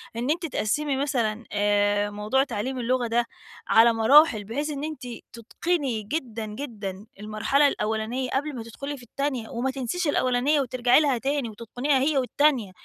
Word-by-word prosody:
إن 240 +3 -2
أنتِ 340 +1 -1
تقسّمي 290 +1 -1
مثلًا 240 -5 -1
آآ، 205 0 +2
موضوع 210 +6 0
تعلّيم 260 +1 -4
اللغة 245 0 0
ده 235 +1 +1 0.4
على 230 +1 +6
مراحِل 225 0 +5
بحيث 285 +9 -3
إن 285 -1 -5
أنتِ 310 -2 -5 0.3
تُتقني 255 +1 -2
جدًا، 230 -2 -4
جدًا 210 -4 -6
المرحلة 215 +7 +2
الأولانية 220 +2 -2
قبل 285 +3 -2
ما 235 - -5
تدخُلي 275 +6 -7
في 250 - -13
التانية، 255 -1 -3
وما 250 +3 -2
تنسيش 270 +6 -2
الأولانية 275 +1 +2
وترجعي 250 -1 +3
لها 280 -5 +2
تاني 275 0 -1
وتتقنيها 245 +6 -1
هي 285 +2 +1
والتانية، 260 -4 +2
250 Hz, 155 wpm, -25 LUFS, 220-280 Hz, 0.4 s, على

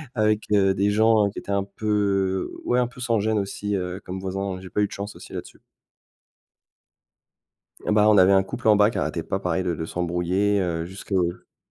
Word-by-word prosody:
Avec, 110 -1 +2
heu, 95 -2 +4
des 100 +2 +2
gens 110 -1 +4
qui - - -7
étaient 100 - -7
un 100 -1 +1
peu 100 -2 -1
ouais, 125 - +2
un 125 - +2
peu 125 +1 -13
sans 115 -3 +1
gêne, 110 0 +1
aussi, 100 +1 -3 0.3
comme 95 +1 -5
voisin, 95 0 -3
j'ai 95 - -10
pas 105 - -1
eu 105 - +2
de - - -25
chance 100 +1 -6
aussi - - -12
là-dessus. - - -8 2.3
Eh - - 0
bah, 105 0 +5
on 105 - +5
avait 95 +1 +6
un 95 0 +5
couple 105 - -5
en 105 - +7
bas 105 +1 +5
qui - - -5
arrêtait 80 +3 -1
pas, 95 - -2
pareil, 90 0 -1
de 90 -2 -1
de 80 - -4
s'embrouiller, 90 +4 0
heu, 85 -2 -2
jusque 95 +3 -11
ouais, 90 -3 -2
100 Hz, 210 wpm, -24 LUFS, 95-105 Hz, 2.3 s, en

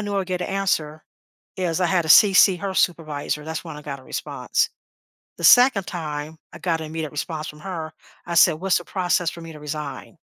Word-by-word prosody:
knew 205 -1 -3
I'd 195 -1 -1
get 180 -1 -3
a - - -3
answer 160 -6 -1 0.5
is 180 -2 -1
I 180 - +3
had 175 0 +2
to 160 - -7
CC 190 +1 +7
her 195 +1 -4
supervisor. 150 -4 -1
That's 160 0 -5
when - - -8
I 150 - -10
got 140 -2 -6
a - - -18
response. - - -2 0.7
The - - -6
2nd 245 -6 +6
time 155 -2 -5
I - - -10
got 165 -3 -1
an 160 - -5
immediate 155 -1 -5
response 155 +1 -4
from 150 - -11
her, 165 -4 -6 0.3
I 170 - -4
said, 160 - +6
"What's 190 0 +2
the 175 - -11
process 180 -2 0
for 170 - -10
me 165 0 -9
to 150 - -12
resign?" 150 -1 -7
165 Hz, 215 wpm, -23 LUFS, 155-185 Hz, 0.7 s, CC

